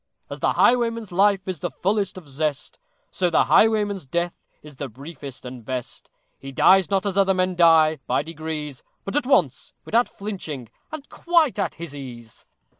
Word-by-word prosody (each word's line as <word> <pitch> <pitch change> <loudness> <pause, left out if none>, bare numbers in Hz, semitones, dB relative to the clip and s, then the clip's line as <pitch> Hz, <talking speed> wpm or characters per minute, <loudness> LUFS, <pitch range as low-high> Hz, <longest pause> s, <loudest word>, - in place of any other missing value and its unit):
As - - -6
the - - +1
highwayman's 230 -4 +2
life 195 +1 +2
is 185 -4 -4
the - - -3
fullest 195 -1 -1
of 175 -5 -11
zest, 150 - -3 0.3
So 180 -2 0
the 165 - +3
highwayman's 210 -3 +3
death 170 +4 -3 0.2
is 150 -3 -13
the 140 -1 -5
briefest 140 +1 -10
and 125 -1 -8
best; 125 +1 -6 0.3
He 135 - -8
dies 190 +6 +5
not 195 0 0
as 200 -1 0
other 195 -1 +3
men 185 0 0
die, 160 -3 +5
by - - +1
degrees, 155 -3 -6 0.2
But 195 - -4
at 290 -4 0
once! 170 - +1
without 235 +2 +2
flinching 160 - -6 0.2
and 310 -2 -8
quite 335 -9 +1
at 200 - -1
his 170 -3 -8
ease! 120 -5 -11
175 Hz, 175 wpm, -23 LUFS, 145-200 Hz, 0.3 s, dies